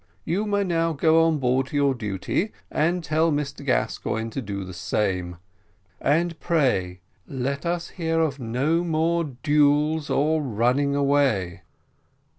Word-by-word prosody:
You 195 +6 -1
may 205 -1 +1
now 165 -3 0
go 160 +2 +4
on 160 -2 +1
board 130 0 +1
to - - -8
your 140 -1 +3
duty, 105 - -2 0.2
and 170 +3 0
tell 160 +2 +1
Mr 145 -1 -3
Gascoigne 115 -3 -1
to 135 - -4
do 100 -3 -5
the 95 0 -8
same; 90 -1 -2 0.6
and 165 +3 +1
pray 95 - 0 0.3
let 140 +4 -3
us 175 0 -2
hear 165 -2 -1
of 150 -4 0
no 135 +8 0
more 170 0 +1
duels 150 +2 +1
or 155 +3 +2
running 130 +3 +1
away." 140 -11 +1
145 Hz, 140 wpm, -24 LUFS, 125-165 Hz, 0.6 s, go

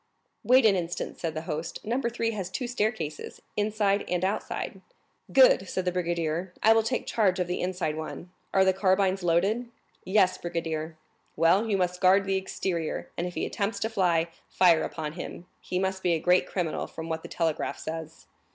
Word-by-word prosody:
"Wait 255 0 +5
an 205 -3 +6
instant," 175 -1 -3
said 160 -2 -3
the 155 - -3
host; 160 -1 -4
"Number 235 +2 0
3 230 -1 -1
has 195 -5 -4
two 250 - -3
staircases,—inside 210 -1 -1
and 180 0 0
outside." 195 - -3 0.5
"Good," - - +6
said 185 - -2
the 180 - +1
brigadier. 175 0 -2
"I 220 - +7
will 225 - +4
take 245 +3 -2
charge 200 -5 +2
of 180 - +1
the 180 +1 -3
inside 180 -4 -1
one. 160 +3 -7 0.2
Are 190 0 +4
the 190 - +4
carbines 190 0 +2
loaded?" 195 +8 +1 0.4
"Yes, 190 -1 +3
brigadier." 165 -2 -3 0.4
"Well, 180 +8 +3
you 200 -2 +1 0.2
guard 190 +2 +5
the 195 0 0
exterior, 185 -3 -3
and 175 - -2
if 180 - -8
he - - -1
attempts 200 0 -2
to 220 - 0
fly, 170 -5 +2 0.2
fire 175 -3 +5
upon 155 -2 -4
him; 175 0 -7
he 180 - -4
must 190 0 -1
be 175 -2 +2
a 165 - +1
great 180 +3 +3
criminal, 175 -4 -2
from 160 0 -7
what 160 0 -3
the - - -10
telegraph 160 -2 -1
says." 160 0 -7
185 Hz, 180 wpm, -27 LUFS, 165-200 Hz, 0.5 s, I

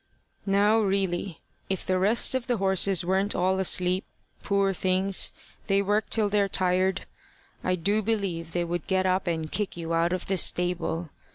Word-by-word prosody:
"Now 205 +3 +3
really 195 -4 -1 0.3
if 190 -2 -3
the 185 0 +1
rest 210 +7 +3
of 260 -1 -2
the 245 -2 0
horses 190 -2 +2
weren't 190 +3 +1
all 185 +1 +1
asleep, 185 0 +2 0.4
poor 200 -1 +1
things 185 +2 +1 0.4
they 195 0 +3
work 205 +2 0
till 220 -2 +2
they're 200 -1 +1
tired 185 +1 0 0.6
I 185 - +1
do 200 +5 0
believe 195 -7 -2
they 175 - 0
would 175 -1 -4
get 190 -1 +1
up 185 0 0
and 160 -2 -2
kick 210 -4 -2
you 165 -1 -4
out 165 +1 +1
of 185 -1 -2
the 190 - -1
stable. 175 -2 0
190 Hz, 170 wpm, -26 LUFS, 180-200 Hz, 0.6 s, Now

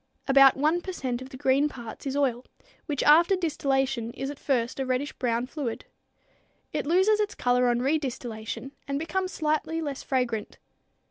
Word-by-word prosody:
About 275 0 +7
one 310 +5 +2
per 375 - -5
cent 250 -7 -3
of 260 - -8
the 260 - -9
green 275 +2 +2
parts 240 0 -8
is 270 +1 -2
oil, 255 -4 +1 0.4
which 290 -4 -1
after 335 +6 +6
distillation 270 -8 0
is 270 +1 -4
at 290 - -11
first 245 -2 -1
a - - +1
reddish 255 +3 -1
brown 240 -1 -1
fluid. 255 -4 -5 0.9
It - - -2
loses 380 +6 +4
its 420 0 -1
color 250 0 +2
on 240 0 +2
redistillation 260 -4 -3 0.2
and 275 0 -1
becomes 365 +5 -2
slightly 310 +1 -1
less 285 -4 -4
fragrant. 240 -5 -2
270 Hz, 170 wpm, -27 LUFS, 250-310 Hz, 0.9 s, About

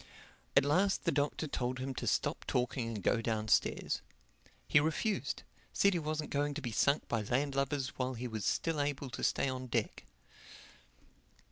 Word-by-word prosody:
At - - +6
last 190 +7 +2
the 170 - +3
Doctor 145 +2 0
told 130 -2 -2
him 130 +1 -3
to - - -4
stop - - 0
talking 125 -1 0
and 110 -4 -4
go 115 - +2
downstairs. 110 -2 +1 0.7
He - - +6
refused—said 200 +4 0
he 175 - +1
wasn't 155 -1 -3
going 145 0 0
to - - -2
be 120 -4 -3
sunk 140 +7 +2
by 115 -2 0
landlubbers 135 +3 0
while 130 0 -3
he 125 +2 -4
was 110 -3 -4
still 165 -3 +1
able 145 -2 -2
to - - -5
stay - - +2
on 130 -1 -3
deck. 115 -3 -2
135 Hz, 160 wpm, -33 LUFS, 120-145 Hz, 0.7 s, At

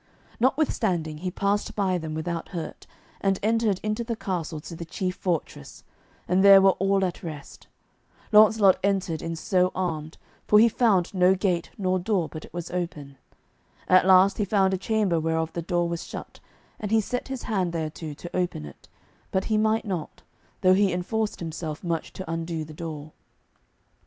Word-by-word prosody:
Notwithstanding 205 - 0
he 180 +2 -3
passed 200 +3 -1
by 190 -3 +1
them 160 -1 -5
without 165 +1 -4
hurt, 170 -4 -7 0.3
and 195 -1 +1
entered 220 -3 +1
into 215 +2 -1
the 230 0 -3
castle 175 -6 -4
to 170 - -9
the 170 - -6
chief 180 +2 -3
fortress, 170 - -4 0.4
and 185 +2 +3
there 195 -1 +9
were 195 0 +6
all 195 0 +2
at 180 - -4
rest. 155 -4 -9 0.6
Launcelot 210 -2 +6
entered 190 -5 0
in 165 0 -4
so 180 +2 +1
armed, 160 -4 -3 0.3
for 210 - +6
he 225 +2 +7
found 210 -6 +2
no 185 0 +4
gate 180 -3 -1
nor 185 -2 0
door 185 -3 0
but 155 - -9
it - - -18
was 175 -1 -6
open. 155 -6 -4 0.7
At 185 0 +5
last 190 +2 +6
he - - +2
found 195 -1 +2
a - - +1
chamber 200 -5 +1
whereof 160 0 -1
the 170 - -3
door 175 0 0
was 170 0 -4
shut, - - -9 0.4
and 210 - -4
he 225 +1 +4
set 250 +4 -3
his 265 -2 -5
hand 190 -6 -1
thereto 160 -2 -5
to 175 +4 -9
open 175 - -1
it, 75 - -13 0.4
but 190 - 0
he - - +4
might 220 +1 +1
not, 180 -6 -5 0.4
though 185 -1 +5
he 195 0 +3
enforced 210 +5 -2
himself 160 -1 -5
much 165 -2 -2
to 190 - -7
undo 165 -1 -3
the 155 - -11
door. 155 -1 -7
180 Hz, 175 wpm, -25 LUFS, 165-200 Hz, 0.7 s, there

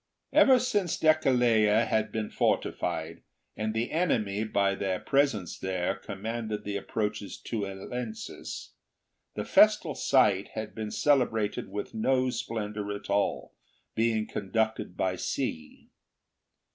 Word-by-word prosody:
Ever 260 -1 +7
since 205 -8 0
Deceleia 120 -8 +4
had 110 -1 0
been 110 -1 -3
fortified, 80 +1 -1 0.3
and 110 0 -2
the 115 +2 -1
enemy, 110 - +1
by 100 -2 +1
their 95 -2 -2
presence 135 -10 0
there, 95 0 -1
commanded 110 +2 -5
the 100 -1 -4
approaches 105 0 -3
to 110 -4 -3
Eleusis, 110 +4 -6 0.6
the - - -3
festal - - +4 0.2
rite 100 -1 +4
had 110 -1 -5
been 110 -1 -4
cele 140 +1 +3
brated 110 -2 -2
with 100 +1 -5
no 130 +3 +1
splendour 105 -3 -4
at 100 0 -7
all, 100 0 0 0.4
being 110 -1 +1
conducted 110 -2 -2
by 95 -1 0
sea. 80 -2 -4
110 Hz, 120 wpm, -28 LUFS, 100-115 Hz, 0.6 s, Ever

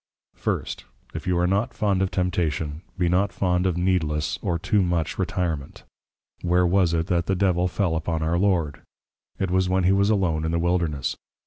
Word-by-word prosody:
First, - - -3 0.3
If - - -6
you 90 -1 +2
are 90 - +2
not 100 +7 0
fond 100 -3 +1
of 95 - +1
Temptation, 80 -5 -1 0.2
be 90 -1 +1
not 95 +4 +2
fond 90 -1 +1
of 90 -2 0
Needless, 80 -5 0
or 85 - 0
Too 95 +4 +1
much 85 -3 -1
Retirement. 85 -6 -2 0.6
Where 90 0 +3
was 90 -1 +3
it, 80 0 0
that 85 -1 0
the 95 - +1
Devil 90 -1 +2
fell 90 -2 0
upon 80 0 -2
our 85 +2 +1
Lord? 90 -7 +1 0.6
it 95 -2 -1
was 95 0 +2
when 95 0 +2
he 90 - +4
was 100 +1 +3
Alone 90 -7 +1
in 80 - -1
the 85 - 0
Wilderness. 85 -6 0
90 Hz, 190 wpm, -24 LUFS, 80-95 Hz, 0.6 s, he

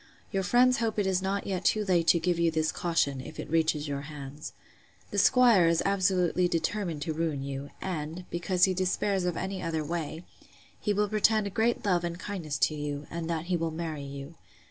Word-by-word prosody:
Your 195 -2 0
friends 250 +6 +4
hope 225 -2 -1
it 205 - +1
is 190 -1 +1
not 195 +1 -1
yet 190 -2 -2
too 215 -1 +2
late 175 -4 +2
to 170 - +5
give 175 0 0
you 170 -1 +3
this 155 -1 0
caution, 145 -6 0
if 155 - -10
it - - -5
reaches 160 -2 +1
your 140 -1 -3
hands. 145 0 -8 0.6
The 205 - +1
'squire 225 -4 +6
is 165 0 +2
absolutely 185 -2 +2
determined 170 -2 -1
to 160 - -2
ruin 155 -3 -2
you; 140 +1 -5
and, 170 -1 -4
because 180 +1 0
he 190 - +6
despairs 185 +1 0
of 175 -2 -1
any 190 +1 -3
other 160 -3 -2
way, 165 0 -4 0.6
he 210 - -1
will 205 +1 +1
pretend 215 -1 +2
great 230 +1 +1
love 180 -3 +2
and 170 0 -3
kindness 175 -7 -4
to 155 - +2
you, 145 -1 -4
and 165 0 -4
that 165 -1 -2
he 180 0 0
will 165 -1 -1
marry 160 -2 -4
you. 140 +2 -8
170 Hz, 205 wpm, -29 LUFS, 155-195 Hz, 0.6 s, squire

